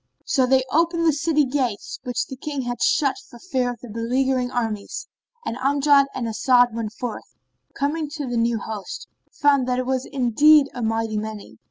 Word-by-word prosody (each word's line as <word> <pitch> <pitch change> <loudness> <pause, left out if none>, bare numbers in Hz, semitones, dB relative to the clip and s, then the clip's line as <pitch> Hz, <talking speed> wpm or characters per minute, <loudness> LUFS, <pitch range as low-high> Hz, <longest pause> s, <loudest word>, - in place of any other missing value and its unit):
So 260 -3 +2
they 260 0 +4
opened 335 +2 +2
the 320 - +4
city 300 0 +2
gates, 255 -6 -2
which 245 -1 -2
the 265 - -8
King 280 0 -4
had 245 -1 -4
shut 275 +1 +2
for 240 - -13
fear 255 -4 -1
of 240 -3 -7
the 245 - -9
beleaguering 250 +3 0
armies, 225 - -3 0.4
and 230 - -2
Amjad 280 +1 +4
and 255 - -2
As'ad 245 +1 +3
went 225 -2 -4
forth 245 0 -6 0.3
and, - - -43
coming 295 +2 -1
to 295 -3 -4
the 245 -1 -3
new 230 0 +1
host, 210 -2 -6 0.2
found 280 -3 +2
that 250 0 0
it 255 - -1
was 260 0 -1
indeed 280 +3 +4
a 245 - -5
mighty 225 -1 -1
many. 210 - -8
255 Hz, 190 wpm, -23 LUFS, 230-280 Hz, 0.4 s, they